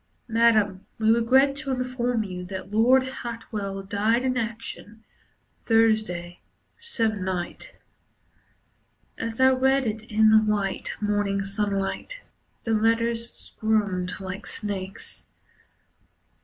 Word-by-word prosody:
"Madam, 220 -4 +3
we 220 0 +3
regret 260 +4 +4
to 280 0 -6
inform 250 -2 -1
you 180 -3 -6
that 190 +1 -7
Lord 250 +5 +4
Hartwell 225 -6 -5
Died 215 +5 +1
in 255 -1 0
action 225 -2 -5 0.6
Thursday 215 -6 +1 0.4
se'nnight." 215 - -2 1.5
As 225 +1 -4
I 260 0 +6
read 265 +1 +3
it 220 -1 -2
in 215 0 +5
the 220 - +8
white, 210 -3 -1
morning 205 -1 0
sunlight, 200 - -3 0.4
The 225 - 0
letters 230 +1 +1
squirmed 205 -5 -1
like 190 +1 -6
snakes. 195 -2 -5
220 Hz, 100 wpm, -25 LUFS, 200-235 Hz, 1.5 s, the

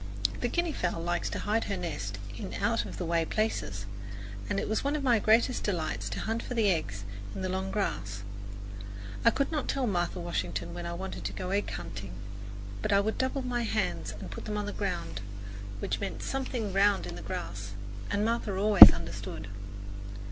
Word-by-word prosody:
The - - +1
guinea 345 -2 0
fowl 175 -7 -1
likes 175 +1 0
to - - -3
hide 220 +2 +1
her 200 - -1
nest 145 - -3 0.2
in - - -5
out - - +1
of - - -7
the 180 - -2
way 165 0 +2
places, 160 - -1 0.6
and 195 - +1
it - - -2
was 220 - 0
one 285 +2 +1
of 295 - -1
my 240 -4 +5
greatest 230 +4 +4
delights 155 - -1
to 100 - -3
hunt 225 +1 -1
for 250 - -5
the 215 -4 +4
eggs 100 - -1 0.3
in 190 - -3
the 185 - 0
long 190 +1 -1
grass. 105 - -2 1.0
I - - +8
could 275 +6 0
not 300 -4 -1
tell 270 -2 +1
Martha 180 -3 0
Washington 170 0 -2
when 175 0 -4
I 170 - -3
wanted 190 +2 -5
to - - -2
go 185 0 -4
egg 200 +1 +1
hunting, 100 0 -6 0.7
but - - 0
I 200 - +6
would 215 +2 0
double 260 +1 +1
my 245 -1 0
hands 230 - 0
and - - -7
put - - -6
them 210 -1 -2
on 205 - -1
the 205 - -3
ground, 85 - -2 0.6
which - - -1
meant 200 - -3
something 250 -6 -2
round 200 +1 +4
in - - -5
the - - -7
grass, 100 - -5 0.4
and 205 +1 +1
Martha 225 -4 0
always 205 0 +12
understood. 100 - -5
195 Hz, 200 wpm, -30 LUFS, 165-225 Hz, 1.0 s, always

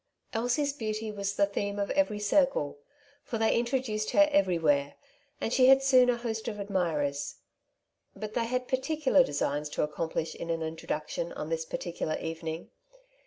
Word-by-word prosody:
Elsie's 245 +5 +1
beauty 215 -4 -3
was 200 -1 -3
the 200 - +4
theme 200 0 -3
of 200 0 -1
every 285 -8 +1
circle; 210 - +1 0.4
for 230 - -4
they 220 0 +2
introduced 235 -3 0
her 300 0 +6
everywhere, 165 - +2 0.4
and 230 - -2
she 255 -1 +5
had 270 0 +7
soon 255 -2 +6
a 245 - +2
host 225 -2 -4
of 210 -3 -4
admirers. 165 -8 -1 0.8
But 215 +1 -6
they 235 - 0
had 250 +1 -2
particular 280 +1 +3
designs 145 - -1
to - - -1
accomplish 160 +2 -2
in 170 - -7
an 165 -1 -1
introduction 160 +1 -4
on 150 - -5
this 165 0 -1
particular 160 -2 -3
evening. 165 0 -5
210 Hz, 160 wpm, -29 LUFS, 165-250 Hz, 0.8 s, had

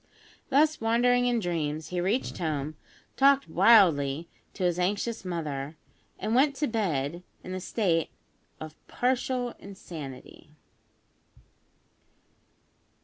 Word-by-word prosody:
Thus 300 +1 +3
wandering 245 +2 +3
in 245 -1 +2
dreams 160 -5 -3
he 180 -1 -2
reached 205 +9 -1
home, 155 -2 -2 0.4
talked 275 0 +4
wildly 165 -9 +4 0.3
to 190 - -4
his 175 -1 +1
anxious 205 +5 -1
mother, 155 -4 -4 0.4
and 215 - -2
went 275 +3 +3
to 295 - 0
bed 175 - -1 0.2
in 185 - -6
a 185 - -3
state 175 -5 0 0.5
of 155 -1 -8
partial 250 -1 -1
insanity. 160 -9 -10
185 Hz, 105 wpm, -28 LUFS, 155-240 Hz, 0.5 s, talked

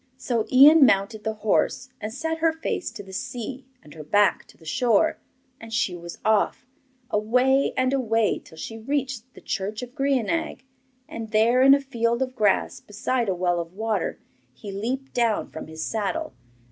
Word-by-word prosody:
So 230 -4 -1
Ian 285 +4 +8
mounted 210 -2 +2
the 220 0 -2
horse 250 +4 +1
and 215 - -4
set 320 +6 -3
her 325 0 +3
face 320 +2 -3
to 225 -3 -9
the 190 -1 -13
sea 255 +4 -6 0.2
and 150 - -14
her 155 - -9
back 205 +7 +2
to - - -20
the 160 - -19
shore, 245 - +2 0.4
and 225 0 -11
she 210 -5 0
was 170 0 -9
off, 220 +3 +1 0.5
away 250 +6 +2
and 255 +1 +2
away 225 -5 +1
till 160 - -17
she 225 +7 -7
reached 260 -1 -3
the - - -13
church 210 +4 -3
of 245 0 -9
Grianaig, 275 +2 -1 0.4
and 225 -1 -7
there, 225 +4 +3
in 270 +1 +8
a - - 0
field 235 -2 0
of 255 -1 -6
grass, 210 -5 +1
beside 230 +2 -2
a 190 - 0
well 175 -1 0
of 170 +1 -6
water, 215 -3 -2 0.4
he 200 +9 -8
leaped 250 +7 -4
down 230 -3 0
from 160 - -8
his 160 0 -5
saddle. 225 +10 -2
230 Hz, 180 wpm, -24 LUFS, 205-265 Hz, 0.5 s, Ian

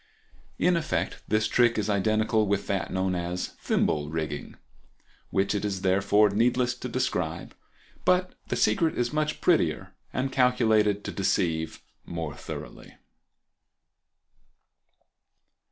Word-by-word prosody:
In 180 - +3
effect 160 -2 -2
this 110 +1 +2
trick 120 -1 +3
is 105 -1 0
identical 110 +1 +2
with 100 0 0
that 95 -3 -2
known 95 0 0
as 90 0 -3
"Thimble 75 -1 +1
Rigging," 75 -2 -4 0.7
which 95 +1 +1
it 105 - -2
is 100 -2 -2
therefore 100 +2 +4
needless 120 +3 +2
to 125 +1 -7
describe, 90 -10 -2 0.5
but 185 0 +2
the - - -1
secret 165 -2 +2
is 120 +2 0
much 150 0 -1
prettier 120 - +1 0.2
and 135 +1 -2
calculated 110 -6 +3
to - - -4
deceive 80 -4 -1 0.2
more 80 -3 -5
thoroughly. - - -9
105 Hz, 120 wpm, -27 LUFS, 90-125 Hz, 0.7 s, therefore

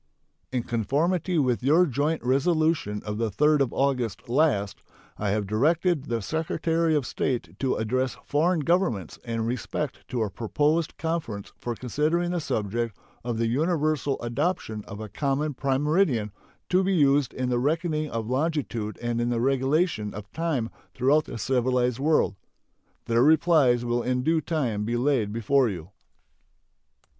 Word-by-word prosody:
In 125 -2 -1
conformity 155 - 0
with 130 -5 +1
your 155 +8 +5
joint 150 +2 -1
resolution 140 - +1
of 105 0 -4
the 115 -1 0
3d 150 +7 +3
of 130 - +1
August 125 -6 -1
last, 120 -7 +1 0.4
I 105 - -1
have 105 +1 0
directed 150 - +1
the 115 -5 -2
Secretary 160 +2 0
of 145 -4 0
State 115 -12 -2
to 135 -2 +1
address 130 +4 -1
foreign 160 +3 +2
governments 145 - 0
in 115 -1 -2
respect 125 +4 -4
to 120 -3 -1
a 105 - -3
proposed 150 - 0
conference 160 -12 -3
for 120 -1 -3
considering 155 +8 0
the 175 - 0
subject 115 - -2 0.3
of 120 -1 -2
the 115 - +1
universal 150 +2 0
adoption 120 - -2
of 100 - -8
a 110 - -5
common 140 +6 -1
prime 135 +1 0
meridian 150 - +2 0.4
to 185 +1 +3
be 190 0 +1
used 140 -4 +3
in 130 -1 -2
the 120 -1 +1
reckoning 155 +2 0
of 115 -3 -3
longitude 130 -6 -1
and 120 0 0
in 120 - 0
the 120 -1 0
regulation 135 - +1
of 100 0 -9
time 155 -8 -1 0.2
throughout 145 +5 +3
the - - -7
civilized 125 +1 +1
world. 150 -2 +2 0.7
Their 115 0 +2
replies 150 -5 +4
will 120 0 0
in 125 0 -1
due 160 +2 +2
time 125 -12 -1
be 120 +3 -1
laid 120 -5 +1
before 120 +3 +2
you. 90 -2 -7
130 Hz, 155 wpm, -26 LUFS, 115-155 Hz, 0.7 s, your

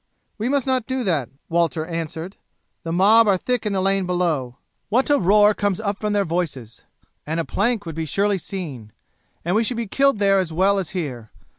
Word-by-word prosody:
"We 225 +4 -1
must 280 -2 +1
not 260 -3 0
do 260 -1 -2
that," 160 - 0 0.2
Walter 165 -2 0
answered. 165 +2 -5 0.5
"The 165 - -5
mob 210 +6 +5
are 195 -2 +4
thick 245 +3 -1
in 205 - -1
the 190 - 0
lane 195 -1 +1
below 160 -9 -1 0.3
what 255 +7 +2
a 290 - +4
roar 210 +3 +5
comes 205 -3 -1
up 205 -2 -2
from 210 -1 -1
their 200 -1 +1
voices! 145 -9 -4 0.5
and 160 +2 -1
a 165 - -1
plank 215 0 0
would 165 - -5
be 160 +1 -3
surely 200 +5 +1
seen, 145 - -7 0.5
and 175 +3 +1
we 225 - +3
should 235 +1 -2
be 235 - -2
killed 275 +4 +2
there 195 -1 +3
as 180 -4 -2
well 195 +4 +2
as 190 - -4
here. 125 -10 -5
190 Hz, 205 wpm, -22 LUFS, 165-210 Hz, 0.5 s, mob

